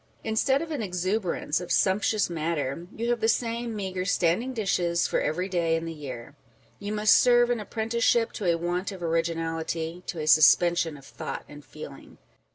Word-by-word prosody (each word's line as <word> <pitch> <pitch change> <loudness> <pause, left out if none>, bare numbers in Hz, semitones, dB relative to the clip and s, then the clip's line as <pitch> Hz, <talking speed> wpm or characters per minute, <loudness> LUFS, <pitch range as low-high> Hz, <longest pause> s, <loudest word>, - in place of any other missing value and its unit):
Instead 265 +6 +1
of 330 - -8
an 290 -6 -2
exuberance 185 -3 -1
of 175 - -7
sumptuous 205 +2 +2
matter, 165 -1 -3
you 235 +2 -1
have 240 - 0
the 225 - +1
same 230 0 -1
meagre 190 -3 -3
standing 185 +6 +1
dishes 180 -7 0
for - - 0
every 180 +5 -1
day 170 -3 +1
in 165 0 -3
the 165 - -5
year. 140 -3 -8 0.5
You 205 0 -5
must 210 -2 +4
serve 240 0 +5
an 240 - 0
apprenticeship 225 +2 0
to 205 - -6
a 170 - +1
want 175 +3 -2
of 185 -3 -8
originality, 165 0 -2
to 170 - -4
a 155 - -3
suspension 165 +1 +5
of 135 - -15
thought 115 +1 -6
and 145 0 -12
feeling. 140 -2 -11
180 Hz, 175 wpm, -26 LUFS, 165-220 Hz, 0.5 s, serve